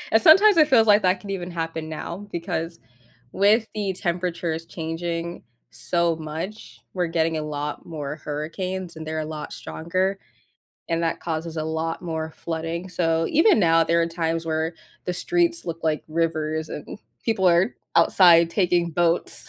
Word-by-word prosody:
and 220 - +5
sometimes 390 - +7
it 305 -2 +6
feels, 235 -6 +5
like, 210 0 +6
that 185 0 +2
could 200 - -8
even 180 -2 -4
happen 165 -2 -4
now, 170 +5 -6
because 165 -1 -4 0.5
with 215 +3 +3
the 205 -3 -1
temperatures 170 -2 -2
changing 165 +1 -4 0.3
so 165 +8 0
much, 160 +7 -7
we're 180 -2 0
getting 165 -1 0
a 155 - -2
lot 150 -1 -4
more 150 -3 -5
hurricanes, 170 +4 -5
and 160 0 -7
they're 155 0 -2
a - - -3
lot 155 -1 -6
stronger, 185 +4 -2 0.7
and 165 0 0
that 165 - 0
causes 165 0 -4
a 155 - -2
lot 160 +1 -3
more 160 -2 -4
flooding, 165 +2 -4
so 165 -2 +1
even 330 - +5
now, 165 -4 +4
there 170 0 +2
are 165 - +1
times 165 0 -2
where 160 +1 -1 0.3
the 180 - -1
streets 340 - 0
look 165 -1 -4
like 155 -1 0
rivers, 155 -1 -1
and 150 - -7 0.3
people 195 -5 +2
are 175 +7 +3 0.2
outside 170 -3 +6
taking 175 -3 +1
boats, 170 +1 0
170 Hz, 165 wpm, -24 LUFS, 160-185 Hz, 0.7 s, sometimes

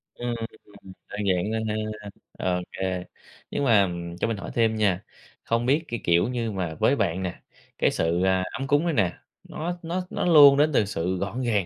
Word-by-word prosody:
Ừm, 120 -1 -3 0.7
à, 105 - -8
dạng 95 +3 +1
nên 110 0 -2
ha, 105 -1 -4 0.5
ô 90 - -2
kê, 95 -1 -3 0.5
nhưng - - -1
mà, 115 -6 +5
ừm, 85 -2 -3
cho - - 0
mình 115 -2 -2
hỏi - - -7
thêm 115 -2 +2
nha, 100 -3 +1 0.4
không 115 +1 0
biết 145 +6 +2
cái, 120 -4 -4
kiểu 85 +2 +3
như 120 -3 -2
mà, 90 -5 -3
với 140 - +4
bạn 95 -6 -1
nè, 90 - -5 0.4
cái - - +2
sự, 85 +2 0
ờ, 95 -1 +2
ấm 135 0 -4
cúng 145 +3 +3
này 170 - +1
nè, 95 - +2 0.4
nó 175 +3 -4
nó 175 +2 -3
nó - - -2
luôn 145 -5 +8
đến 150 +2 +4
từ 105 - +3
sự 90 -1 -2
gọn 100 +7 -3
gàng, 105 -7 +1
110 Hz, 205 wpm, -25 LUFS, 95-125 Hz, 0.7 s, luôn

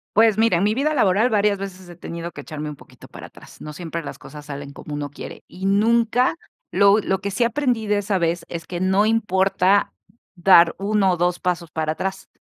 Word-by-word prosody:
Pues, 220 -1 +5
mira, 225 -4 +3
en - - 0
mi 210 +1 +2
vida 300 +4 0
laboral 215 -1 +3
varias 205 -2 +2
veces 185 -2 -8
he 175 - -12
tenido 170 0 -6
que - - -11
echarme 150 +1 -6
un 150 - -9
poquito - - -17
para - - -10
atrás. - - -16
No 150 0 -8
siempre 170 0 -5
las 150 - -8
cosas 150 -1 -12
salen 140 -1 -7
como 145 +1 -9
uno 145 -1 -4
quiere. - - -10
Y 190 +1 -7
nunca 230 +7 +2 0.3
lo 200 +1 +5
lo 190 -2 -1
que 200 0 -4
sí 235 +5 0
aprendí 240 -2 0
de 205 0 +1
esa 205 -1 -1
vez 170 0 -1
es 170 -1 -6
que 175 0 -5
no 190 +3 +2
importa 195 -2 +2 0.4
dar 175 -2 +6
1 200 -1 +2
o 175 - -1
2 175 +1 0
pasos 175 -2 -2
para 155 0 -2
atrás. 190 +4 -5
190 Hz, 215 wpm, -22 LUFS, 170-210 Hz, 0.4 s, dar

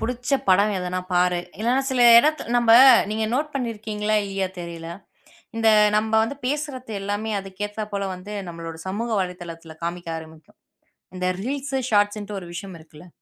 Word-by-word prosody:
புடிச்ச 250 +3 -3 0.2
படம் 200 +3 +4
எதனா 180 0 -3
பாரு. 180 0 +2 0.2
இல்லைன்னா, 245 +4 +2
சில 255 -2 +2 0.2
இடத்துல 305 -3 +1
நம்ப 235 -1 +4 0.4
நீங்க 220 +1 -1
நோட் 300 +3 0
பண்ணி 245 -4 -2
இருக்கீங்களா, 215 0 -2
இல்லையா, 195 -1 -2
தெரியல. 170 -1 -7 0.7
இந்த 225 0 +2 0.3
நம்ப 220 +1 -1
வந்து 280 +5 -4
பேசுறது 265 -4 -3
எல்லாமே 205 +2 -3
அதுக்கு 195 +1 -7
ஏத்தா 210 +1 -5
போல 200 -1 -1
வந்து, 190 +3 -9
நம்மளோட 165 -1 -8
சமூக 220 +5 -3
வலைத்தளத்துல 170 -3 -7
காமிக்க 170 0 -4
ஆரம்பிக்கும். 160 -1 -13 0.6
இந்த 180 - -2 0.2
ரீல்ஸ், 275 +2 -3
ஷாட்ஸ்ன்ட்டு 205 -1 +1
ஒரு 180 - -9
விஷயம் 185 +1 -7
இருக்குல்ல. 160 +2 -15
205 Hz, 155 wpm, -23 LUFS, 180-230 Hz, 0.7 s, படம்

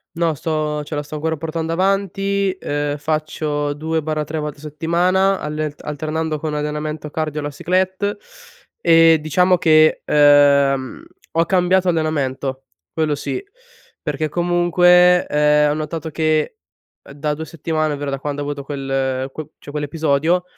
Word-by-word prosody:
No, 165 -2 +1
sto 150 0 -2
cioè 150 - -5
la 145 - -2
sto 150 +1 -8
ancora 160 +1 -2
portando 165 +1 -3
avanti, 195 +2 0
ehm, 145 0 -2
faccio 150 -1 -2
2/3 155 0 -2
volte 150 -1 -5
a 145 - -16
settimana 175 +5 +1
alle 150 0 -3
alternando 155 +1 -3
con 155 -1 -3
allenamento 150 0 -4
cardio 155 -1 -3
e - - -7
la 145 - -4
cyclette, 185 +6 -1 0.6
e 165 -1 +6
diciamo 180 +4 +3
che, 155 -1 +4
uhm, 140 -2 +4 0.3
ho 165 +1 +2
cambiato 185 0 +2
allenamento, 140 -5 -1 0.3
quello 155 -2 0
sì, 145 - -3 0.6
perché 150 +1 -2
comunque, 175 +1 +4
ehm, 150 0 +3
ho 145 - +1
notato 160 +1 -4
che, 155 - 0 0.5
uhm, - - -13
da 150 +1 -2
2 160 +1 -6
settimane, 155 -1 -2
ovvero 145 0 -4
da 135 - -2
quando 145 +1 -4
ho 145 - -3
avuto 145 -1 -4
quel 135 -1 -2
qu 155 0 -7
cioè - - -12
quell'episodio, 150 +3 0
155 Hz, 145 wpm, -19 LUFS, 145-165 Hz, 0.6 s, e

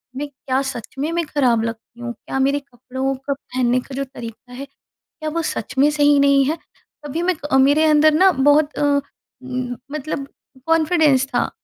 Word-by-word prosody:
मैं 290 +2 -3
क्या 265 -1 -2
सच 235 +1 -9
में 305 +4 -1
मैं 340 0 -1
खराब 255 -7 +1
लगती 230 +1 -7
हूँ? 240 0 -4
क्या 265 - -5
मेरे 275 +2 +2
कपड़ों 260 0 -4
का 270 +2 -3
पहनने 255 -2 -1
का 265 +1 -9
जो 275 - -1
तरीका 245 -2 -10
है 275 +3 -7 0.4
क्या 310 -1 -7
वो 335 +2 -2
सच 265 -4 -4
में 285 +2 +5
सही 290 -1 +4
नहीं 280 -1 +5
है? 315 +4 -1 0.5
कभी 315 +4 -3
मैं 370 +1 +1 0.2
अ, 265 - +5
मेरे 285 +4 +4
अंदर 310 0 +5
ना 375 +5 +5
बहुत 290 +1 +3
अ, - - -2 0.6
उम, 255 -1 -4 0.2
मतलब 295 -1 -4 0.4
कॉन्फिडेंस 315 -4 +3
था - - 0
275 Hz, 185 wpm, -20 LUFS, 255-300 Hz, 0.6 s, में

